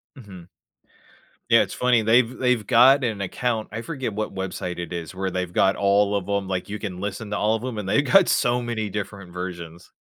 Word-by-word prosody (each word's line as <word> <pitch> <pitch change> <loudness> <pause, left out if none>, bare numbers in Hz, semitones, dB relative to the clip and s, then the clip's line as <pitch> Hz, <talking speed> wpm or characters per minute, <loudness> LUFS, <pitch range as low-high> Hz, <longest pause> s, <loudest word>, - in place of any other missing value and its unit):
Mhm. 95 -9 -12 1.0
Yeah. - - +7
It's - - -7
funny. 125 -2 +2
They've 115 +3 +3
they've 125 -4 +1
got 130 +6 +6
an 110 -5 -2
account. 110 +3 -2
I 115 - -4
forget 130 -7 -4
what 110 0 -4
website 90 -2 -5
it 85 0 -5
is 85 -1 -6
where 95 +1 -3
they've 90 -1 -3
got 95 +2 +3
all 100 +1 +2
of 100 -1 -3
‘em 100 -1 -1
like, 95 +1 -3
you 105 +1 -5
can 90 -4 -6
listen 105 +2 -5
to - - -1
all 110 +1 +1
of 110 - -5
‘em, 125 -4 -5
and 100 -2 -4
they've 145 +8 +2
got 195 -2 +6
so 120 0 +2
many 115 -3 -3
different 100 -3 -6
versions. 85 -2 -7
105 Hz, 215 wpm, -23 LUFS, 95-120 Hz, 1.0 s, Yeah